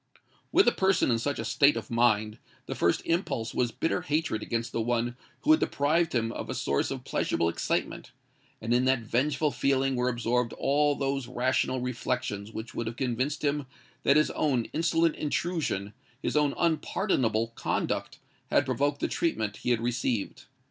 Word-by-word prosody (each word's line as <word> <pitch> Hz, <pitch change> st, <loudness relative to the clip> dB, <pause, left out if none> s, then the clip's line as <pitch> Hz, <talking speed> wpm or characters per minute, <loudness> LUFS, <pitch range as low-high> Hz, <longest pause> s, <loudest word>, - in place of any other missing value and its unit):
With 390 Hz, -, +5 dB
a -, -, +7 dB
person 190 Hz, -8 st, +2 dB
in 115 Hz, -, +2 dB
such 140 Hz, +4 st, -2 dB
a -, -, -4 dB
state 140 Hz, 0 st, +4 dB
of -, -, -6 dB
mind, 110 Hz, -2 st, +2 dB, 0.3 s
the -, -, -4 dB
first 85 Hz, -, +1 dB
impulse 165 Hz, -10 st, -1 dB
was 120 Hz, -2 st, +1 dB
bitter 165 Hz, +7 st, -1 dB
hatred 155 Hz, -9 st, -1 dB
against 115 Hz, +1 st, -2 dB
the 115 Hz, -, -1 dB
one 120 Hz, +1 st, 0 dB, 0.3 s
who 310 Hz, -, +3 dB
had 315 Hz, -, +6 dB
deprived 155 Hz, +2 st, +1 dB
him 115 Hz, -1 st, +1 dB
of -, -, -6 dB
a -, -, -3 dB
source 70 Hz, -, 0 dB
of -, -, -5 dB
pleasurable 85 Hz, -, 0 dB
excitement; -, -, -2 dB, 0.5 s
and 115 Hz, +2 st, -1 dB
in 125 Hz, +1 st, +3 dB
that 130 Hz, -2 st, +3 dB
vengeful 145 Hz, +6 st, 0 dB
feeling 135 Hz, -1 st, +1 dB
were 125 Hz, 0 st, +1 dB
absorbed 120 Hz, 0 st, 0 dB
all 145 Hz, +1 st, +2 dB
those 135 Hz, -2 st, -2 dB
rational 130 Hz, +1 st, 0 dB
reflections 125 Hz, -4 st, -3 dB
which 110 Hz, +1 st, -7 dB
would 115 Hz, -, -3 dB
have 115 Hz, -, -4 dB
convinced 130 Hz, +3 st, -1 dB
him 145 Hz, -1 st, 0 dB, 0.3 s
that 140 Hz, -, +4 dB
his 150 Hz, -, +3 dB
own 130 Hz, -6 st, +1 dB
insolent 165 Hz, 0 st, +2 dB
intrusion—his 145 Hz, -, -3 dB
own 150 Hz, -2 st, +2 dB
unpardonable 150 Hz, -, +1 dB
conduct—had 115 Hz, -, -2 dB
provoked 145 Hz, +1 st, 0 dB
the -, -, +1 dB
treatment 110 Hz, -11 st, -1 dB
he -, -, -3 dB
had 120 Hz, -2 st, +2 dB
received. 120 Hz, -2 st, -2 dB
125 Hz, 170 wpm, -28 LUFS, 115-145 Hz, 0.5 s, a